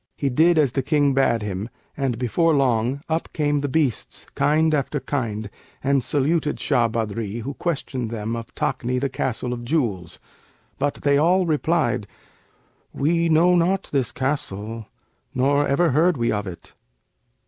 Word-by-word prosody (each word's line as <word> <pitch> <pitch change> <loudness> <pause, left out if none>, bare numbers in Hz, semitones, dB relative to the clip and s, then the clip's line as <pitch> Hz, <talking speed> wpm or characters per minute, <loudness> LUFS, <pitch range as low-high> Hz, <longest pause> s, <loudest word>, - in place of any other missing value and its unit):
He 140 - 0
did 160 +6 +4
as 145 -5 +3
the 135 - 0
King 145 0 +2
bade 120 -5 +2
him, 100 +2 -4 0.3
and 135 -4 -1
before 155 +7 +2
long, 130 0 +1
up 160 +1 -2
came 145 -1 +1
the 145 - -1
beasts, 140 -6 -1
kind 155 +3 +2
after 145 0 0
kind, 110 -7 -3 0.4
and 135 -1 +2
saluted 150 +2 0
Shah 120 -1 +2
Badri 115 -1 -3
who 140 +4 -4
questioned 135 -7 -3
them 115 0 -3
of 115 0 -7
Takni, 125 +1 -1
the 140 +1 -1
Castle 125 -1 -2
of 120 -1 -6
Jewels, 115 - -1 0.6
but 145 +1 0
they 140 0 +4
all 180 +4 +3
replied, 150 -8 0 0.9
'We 165 +3 +1
know 165 +3 +5
not 180 +3 +1
this 135 -5 +1
castle, 115 -5 -3 0.5
nor 140 +3 +2
ever 165 +4 +2
heard 160 +4 +3
we 115 -1 +1
of 105 -1 -2
it.' 90 -2 -10
135 Hz, 155 wpm, -23 LUFS, 115-155 Hz, 0.9 s, know